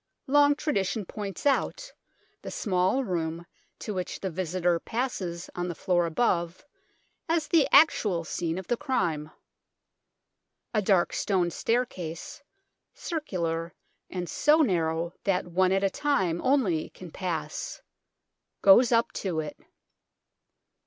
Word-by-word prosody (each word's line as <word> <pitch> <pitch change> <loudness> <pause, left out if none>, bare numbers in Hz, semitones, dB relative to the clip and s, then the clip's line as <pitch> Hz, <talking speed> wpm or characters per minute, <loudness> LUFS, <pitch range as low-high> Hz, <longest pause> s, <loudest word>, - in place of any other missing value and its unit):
Long 290 +1 +5
tradition 205 - -1
points 200 +2 -6
out 290 - 0 0.5
the - - -7
small 190 +6 +1
room 170 -4 -3 0.3
to 210 - -5
which 185 -2 -4
the 190 - -3
visitor 175 0 0
passes 190 -9 -3
on 175 0 -3
the 175 - -4
floor 175 -1 +1
above 170 - 0 0.6
as 325 -2 +1
the 325 -4 +4
actual 205 - +5
scene 165 +1 -3
of 190 - -5
the 240 - 0
crime. 170 - -1 1.4
A 215 - +2
dark 190 -3 +2
stone 180 -4 +1
staircase, 190 - -3 0.5
circular 170 - -3 0.3
and 180 -1 -4
so 300 - +3
narrow 170 - 0
that 195 -3 +1
one 185 +2 +2
at 195 +1 +2
a 195 - +3
time 190 - 0
only 250 - +2
can 180 -3 -11
pass, 160 - -4 0.8
goes 230 +6 +7
up 230 0 +3
to 180 -5 -2
it. 155 -1 -4
185 Hz, 125 wpm, -27 LUFS, 170-240 Hz, 1.4 s, goes